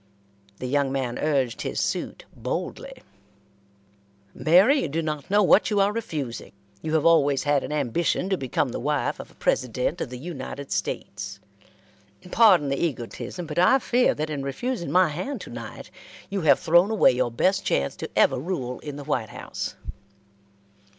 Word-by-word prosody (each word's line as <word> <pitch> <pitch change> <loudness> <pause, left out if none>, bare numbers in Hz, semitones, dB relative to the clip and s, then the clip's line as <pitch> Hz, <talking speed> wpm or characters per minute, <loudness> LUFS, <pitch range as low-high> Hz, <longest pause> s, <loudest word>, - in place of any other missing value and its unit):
The - - -6
young 140 +1 +1
man 130 -3 -2
urged 135 -6 0
his - - -3
suit - - -3
boldly: - - -5 1.3
"Mary, 195 - +4
you - - -1
do 165 +3 -2
not 150 -2 -4
know 205 +1 +4
what 195 - +5
you 210 -2 +1
are 200 +1 +3
refusing. 150 - -5 0.3
You 160 0 -2
have 155 - +2
always 145 -5 +4
had 145 -1 +2
an - - -5
ambition 150 +5 0
to - - +4
become 130 -5 -1
the - - -4
wife 145 +2 -1
of - - -8
a - - -21
President 125 +6 -1
of - - -3
the 125 - -7
United 140 -2 -7
States. 100 -1 -4 0.9
Pardon 190 -11 +5
the 140 +3 -1
egotism, 160 +4 -4
but 155 +1 -3
I 185 +9 +6
fear 250 -1 +2
that 155 +1 -3
in 145 -2 -3
refusing 170 - -3
my 185 -1 +4
hand 185 - -4
to - - -9
night 115 -2 -8 0.4
you 200 -1 -1
have 155 - +5
thrown 175 +4 +4
away 220 -2 +5
your 125 -1 0
best 185 - +1
chance 70 - 0
to - - -5
ever - - +4
rule 130 -6 -4
in 145 -2 -7
the 145 - -7
White 125 -6 -2
House." - - -6
150 Hz, 170 wpm, -25 LUFS, 130-180 Hz, 1.3 s, I